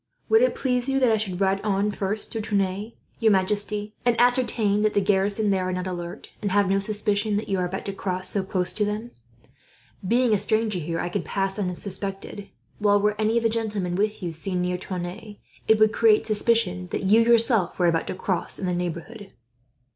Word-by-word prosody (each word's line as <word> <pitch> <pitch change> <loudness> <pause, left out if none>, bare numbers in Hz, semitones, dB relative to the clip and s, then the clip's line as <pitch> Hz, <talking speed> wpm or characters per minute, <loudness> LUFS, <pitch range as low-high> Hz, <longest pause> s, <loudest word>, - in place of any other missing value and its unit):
"Would 445 +1 +5
it - - +2
please 250 -1 -1
you 270 0 +1
that 255 -3 +3
I 220 - +3
should 190 -4 -3
ride 195 0 +1
on 205 0 0
first 205 +1 -3
to 225 - -3
Tonneins, 200 +1 -1 0.3
your 225 -2 +4
majesty, 205 +2 -1
and 240 -1 +2
ascertain 240 -4 +3
if 215 - +2
the - - +3
garrison 200 +1 +1
there 185 -1 0
are - - -1
not 180 0 -3
alert, 175 -2 -6
and 205 - -1
have 200 0 +2
no 195 +1 +2
suspicion 205 +1 0
that 210 - -4
you 195 -1 0
are 180 - 0
about 190 +2 -6
to 200 - -4
cross 185 -1 -3
so 200 - +1
close 185 -1 0
to 210 - 0
them? 210 +3 -3 1.0
Being 240 +1 +3
a 205 - +3
stranger 215 -1 +1
here 165 +1 -3
I 175 - -2
could - - -2
pass 195 0 -2
unsuspected; 195 +1 -5 0.3
while 205 -1 +3
were 210 +1 +2
any 220 +2 +2
of 230 - +1
the 225 - +3
gentlemen 210 -5 -2
with 210 +2 -1
you 175 - -2
seen 180 +3 -3
near 180 0 -2
Tonneins, 185 +4 -6 0.3
it 220 - +5
would 215 0 +4
create 220 -2 +4
suspicion 210 -4 +1
that - - -3
you, 210 +4 +5
yourself, 230 -4 +3
were 180 - +2
about 165 -1 +1
to - - -4
cross 185 -1 -2
in 195 - -4
the 180 - 0
neighbourhood." 180 +4 -5
205 Hz, 210 wpm, -24 LUFS, 185-220 Hz, 1.0 s, Would